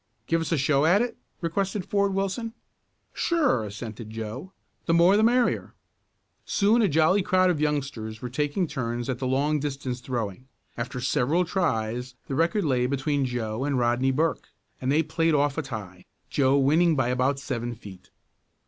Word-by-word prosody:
"Give 165 0 +1
us 165 - -3
a 165 - +2
show 140 +2 +3
at 200 +7 +5
it?" 245 - -4 0.3
requested 190 +3 -1
Ford 200 -1 +1
Wilson. 195 +4 -2 0.6
"Sure," 300 - +1
assented 110 +1 -7
Joe. 115 - -6 0.4
"The 165 - +3
more, 175 +4 +6
the 210 - +4
merrier." 240 +2 +2 0.7
Soon 215 +4 +3
a 215 - +4
jolly 160 +5 +3
crowd 185 0 +3
of 155 -4 -2
youngsters 135 -8 -2
were 125 - -5
taking 150 +7 0
turns 120 -5 -3
at 125 -2 -2
the 130 - -2
long 145 +4 +1
distance 135 -3 -4
throwing. 120 -2 -4 0.3
After 120 +1 -4
several 135 +7 +1
tries 125 - -1
the - - -5
record 170 +6 +1
lay 125 -4 +2
between 140 +1 0
Joe 120 -1 -3
and 140 -1 0
Rodney 120 +2 +2
Burke, 155 +5 0 0.3
and 130 +1 0
they 155 +3 +3
played 160 +1 +1
off 145 -1 +2
a - - +1
tie, 105 - -8 0.3
Joe 135 0 +3
winning 155 +5 +4
by 130 -3 +1
about 130 +2 +1
seven 120 -3 -4
feet. 95 -4 -13
140 Hz, 170 wpm, -26 LUFS, 125-170 Hz, 0.7 s, more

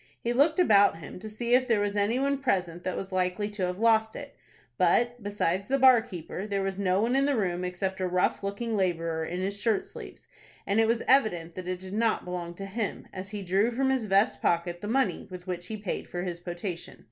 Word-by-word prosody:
He 235 - -1
looked 295 +5 +3
about 205 - +5
him 160 +2 -9
to 215 +3 -7
see 235 +3 -2
if 255 0 +4
there 230 -4 +3
was 205 0 -1
any 205 +4 +2
one 275 +1 0
present 180 -9 -1
that 185 - -2
was 195 - -5
likely 185 +2 0
to 200 -3 -2
have 180 0 -4
lost 220 0 +3
it. - - -8 0.4
But, 240 0 +2
besides 200 -2 -1
the 275 - +2
bar 260 -3 +7
keeper, 190 -1 -7
there 200 -1 -1
was 195 0 -3
no 185 -1 +2
one 235 +4 +1
in 275 +1 +3
the 285 - +2
room 180 -5 -1
except 190 +1 -3
a 185 - +1
rough 180 0 +1
looking 205 +3 -3
laborer 165 -4 0
in 175 +3 -4
his 200 +1 -3
shirt 225 -3 +1
sleeves, - - -11 0.4
and 200 +2 +1
it 225 - +4
was 230 0 +1
evident 180 -11 +3
that 185 0 -7
it 185 0 -2
did 185 +1 -9
not 225 +1 +1
belong 175 -1 -5
to 195 - -6
him, 205 +2 -4
as 190 +1 -6
he 205 -1 -5
drew 195 +5 +2
from 265 +3 +1
his 260 -4 0
vest 200 +3 +2
pocket 175 0 0
the 205 - -5
money 225 -6 0
with 180 -1 -9
which 180 -1 -5
he 220 - -5
paid 205 -3 -4
for 175 0 -4
his 175 -2 -4
potation. 175 0 -6
200 Hz, 235 wpm, -28 LUFS, 180-225 Hz, 0.4 s, bar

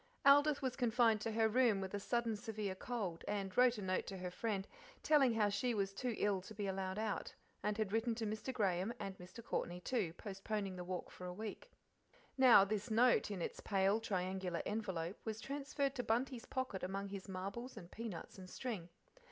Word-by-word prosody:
Aldith 285 +1 +6
was 255 -1 0
confined 235 -3 +3
to 225 0 -2
her 225 0 +4
room 230 -2 +4
with 190 0 -4
a 205 - -1
sudden 235 +1 0
severe 215 -3 -3
cold, 190 -5 -3
and 195 -2 -2
wrote 250 -1 +5
a 205 - -4
note 185 0 0
to 195 - -5
her 180 -1 -4
friend, 200 -1 -2 0.4
telling 275 -6 +5
her 220 - +3
how 205 - +4
she 225 +4 0
was 195 -1 0
too 240 +3 -2
ill 200 -2 +1
to 205 +4 -10
be 205 0 -2
allowed 190 0 -2
out, 215 -1 -2 0.3
and 210 0 0
had 215 -2 -1
written 225 +1 +1
to 225 -1 -2
Mr. 215 +4 -3
Graham, 195 -3 +1
and 195 -1 -4
Mr. 185 +6 -10
Courtney, 175 -5 -2
too, 200 -5 -1
postponing 195 0 -4
the 180 - -5
walk 180 0 -4
for 180 - -8
a - - -4
week. 215 - -6 0.7
Now 250 -7 +8
this 210 +3 -2
note, 240 +2 +4
in 190 -4 -3
its - - -4
pale 195 0 +2
pink 225 - -8
triangular 185 -3 -1
envelope, 190 -5 -2
was 220 -1 -3
transferred 275 +1 -2
to 255 - -2
Bunty's 240 +2 0
pocket 260 -7 -2
among 195 +2 -3
his 195 -1 -7
marbles 200 +7 -5
and 175 -4 -9
peanuts 215 -4 -6
and 185 -1 -9
string. 210 -9 -4
210 Hz, 205 wpm, -38 LUFS, 190-235 Hz, 0.7 s, Now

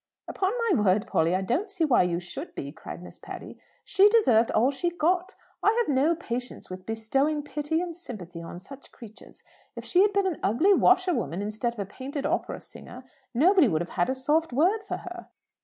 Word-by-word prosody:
"Upon 380 0 -1 0.2
my 220 - +3
word, 200 +1 +2
Polly, 165 +3 +1
I 190 - -1
don't 310 - -1
see 375 -5 0
why 270 -5 +4
you 175 -1 0
should 265 - -8
be," 140 - -5
cried 170 +2 -9
Miss - - -12
Patty. - - -9 0.2
"She 400 +1 +5
deserved 250 - +4
all 245 +5 +3
she 285 +6 -1
got. 350 +3 0 0.3
I 425 - +3
have 440 - +1
no 300 +6 +3
patience 250 - -6
with 185 0 -8
bestowing 270 +7 0
pity 295 +2 -2
and 350 -2 -5
sympathy 185 - -9
on 170 +1 -8
such 275 +8 -13
creatures. 225 -1 -14 0.3
If - - -8
she 365 - +3
had 410 +1 +4
been 400 -1 +1
an 365 -5 -1
ugly 315 - +3
washerwoman, 360 - +2
instead 215 +3 -2
of 235 - -12
a 200 - -2
painted 275 +7 -6
opera - - -2
singer, 250 +1 -12 0.3
nobody 345 +3 +5
would 160 -6 0
have 175 - -11
had 175 +4 0
a 260 - 0
soft 300 +5 +1
word 360 - +2
for - - -3
her." 360 0 -9
275 Hz, 205 wpm, -26 LUFS, 210-355 Hz, 0.3 s, She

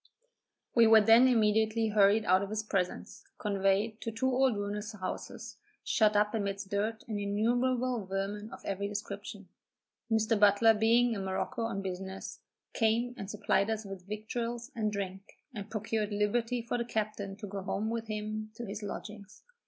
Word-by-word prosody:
We 230 -2 +6
were 220 0 +8
then 225 +4 +7
immediately 220 -1 +2
hurried 210 +1 +4
out 185 +1 +4
of 200 - -4
his 215 0 -2
presence, 190 -4 -3
conveyed 200 +2 0
to - - -3
two 225 +4 -3
old 255 -3 +2
ruinous 205 +1 -4
houses, 185 -3 -6 0.3
shut 215 -2 +3
up 210 +1 +3
amidst 200 -2 -2
dirt 215 +2 -1
and 215 -3 -3
innumerable 240 +2 0
vermin 200 +2 -3
of - - -11
every 200 +1 -2
description. 205 -1 -6 0.6
Mr. 220 -1 +2
Butler 210 +2 +6
being 230 +2 +3
at 200 - -3
Morocco 190 +6 -3
on 195 -3 -3
business, 190 +1 -6 0.3
came 235 +2 +1
and 195 -4 -7
supplied 205 -1 +1
us 220 -1 -2
with 195 -2 -9
victuals 230 +4 -4
and 215 -2 0
drink, 195 -1 -5 0.2
and 210 -2 -7
procured 215 0 -2
liberty 230 +4 0
for 240 +1 -2
the 235 - -1
captain 215 -3 -3
to 210 +1 -8
go 200 0 -5
home 210 +3 -2
with 230 -1 -3
him 215 0 -4
to 235 - -6
his 205 +1 -6
lodgings. 205 0 -8
215 Hz, 165 wpm, -31 LUFS, 200-225 Hz, 0.6 s, were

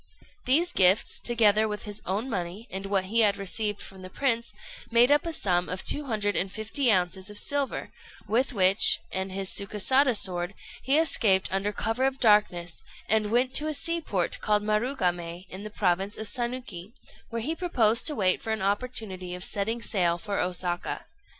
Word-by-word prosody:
These 335 +7 +2
gifts, 190 +2 +3
together 220 -2 +3
with 210 -1 -5
his 205 -1 -3
own 200 +7 -2
money, 195 0 -5
and 195 +1 -5
what 195 -1 0
he 215 +5 0
had 205 -3 +3
received 205 +1 -1
from 190 -1 -10
the 185 - -9
prince, 235 +1 -1 0.4
made 235 +3 +4
up 295 +3 +3
a - - -2
sum 180 - 0
of 185 +1 -3
two 295 - +2
hundred 210 -5 -1
and 190 +1 0
fifty 225 +5 0
ounces 185 0 0
of 210 - -8
silver, 285 +2 -1 0.4
with 235 +7 +1
which 195 -3 +6
and 190 0 -3
his 195 0 -2
Sukésada 230 +6 +2
sword 180 0 +1 0.3
he 275 +3 +2
escaped 220 -12 +2
under 195 +2 -1
cover 225 +5 -1
of 270 0 -1
darkness, 210 -7 +2 0.3
and 215 0 +1
went 250 +3 +1
to 305 - +1
a 310 - -1
sea 335 +3 +1
port 190 - -2
called 210 -1 +1
Marugamé, 185 -6 -2
in 190 - -8
the 215 - -6
province 195 -1 -1
of 220 - -5
Sanuki, 235 -6 -5 0.4
where 230 -1 -4
he 310 +6 -1
proposed 240 - +2
to 300 - +2
wait 185 -4 +1
for 220 - -4
an 220 -3 -2
opportunity 200 -4 -2
of 180 - -8
setting 225 +5 -2
sail 175 -5 +1
for 200 +3 -4
Osaka. 180 -1 -2
210 Hz, 180 wpm, -26 LUFS, 190-240 Hz, 0.4 s, which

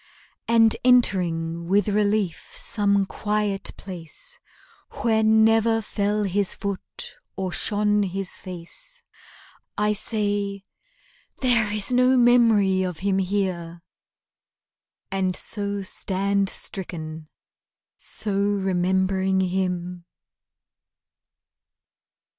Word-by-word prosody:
And 225 -1 +5
entering 170 -9 +2
with 200 +4 +2
relief 205 -3 0
some 200 -2 +1
quiet 210 -1 -2
place 175 -5 -10 0.6
Where 220 -2 +3
never 220 +1 +4
fell 210 -1 -1
his 200 0 +1
foot 200 -2 -4 0.2
or 190 -1 -3
shone 210 +2 +1
his 195 -1 -3
face 340 - -10 0.7
I 210 0 +2
say, 205 -2 -1 0.8
"There 235 -5 +2
is 210 +4 -2
no 255 +1 +4
memory 225 -6 +4
of 180 -3 -3
him 195 +1 0
here!" 180 -3 -2 1.3
And 190 -1 0
so 200 -2 -2
stand 195 +1 0
stricken, 160 -5 -5 0.7
so 210 -2 -3
remembering 190 -1 +1
him! 180 -1 -2
200 Hz, 85 wpm, -24 LUFS, 185-210 Hz, 1.3 s, And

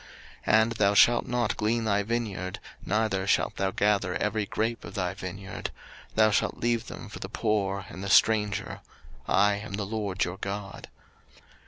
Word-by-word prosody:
03:019:010 110 - +6
And 115 - -2
thou 105 -3 +2
shalt 120 +3 +5
not 120 -2 0
glean 115 +2 +1
thy 100 -2 +2
vineyard, 100 -4 -3 0.3
neither 100 -2 0
shalt - - +1
thou 95 -1 +1
gather 100 -2 +1
every 105 0 -1
grape 115 +1 -2
of - - -9
thy 90 -2 -1
vineyard; 95 0 -6 0.5
thou 110 0 +5
shalt - - +1
leave 120 -1 0
them - - -8
for - - -9
the - - -6
poor 100 -3 -1
and 95 +1 -6
stranger: 105 0 +3 0.5
I 100 +1 +3
am 105 0 -8
the 100 0 -2
LORD 100 -3 -2
your 90 +2 -3
God. 100 0 -6
105 Hz, 165 wpm, -28 LUFS, 95-110 Hz, 0.5 s, 03:019:010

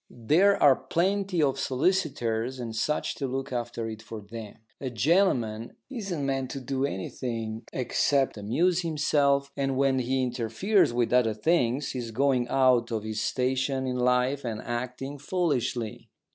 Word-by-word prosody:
There 165 - +3
are 140 -2 +7
plenty 185 +5 0
of 135 -2 +1
solicitors 130 -6 0
and 115 -2 -5
such 150 +7 0
to 140 - -2
look 135 +1 -4
after 120 -1 -3
it 110 -1 -7
for 110 0 -8
them. 105 0 -9 0.2
A 135 - -3
gentleman 120 - +1 0.2
isn't 195 - -3
meant 135 -1 -1
to 135 - -5
do 135 +1 -1
anything 115 0 -4
except 135 +1 +1
amuse 160 - +1
himself, 145 -4 +1
and 135 -2 -1
when 135 -1 +2
he 130 +1 0
interferes 125 - +1
with 120 0 0
other 115 -4 +3
things 135 +1 +1
he 130 - -4
is 120 -2 -5
going 125 +1 +1
out 125 -3 +3
of 110 -2 -2
his 110 0 -3
station 130 +1 0
in 125 -1 -2
life 125 +3 +2
and 110 -3 -4
acting 125 +4 -4
foolishly. 135 - -2
130 Hz, 155 wpm, -27 LUFS, 115-140 Hz, 0.2 s, are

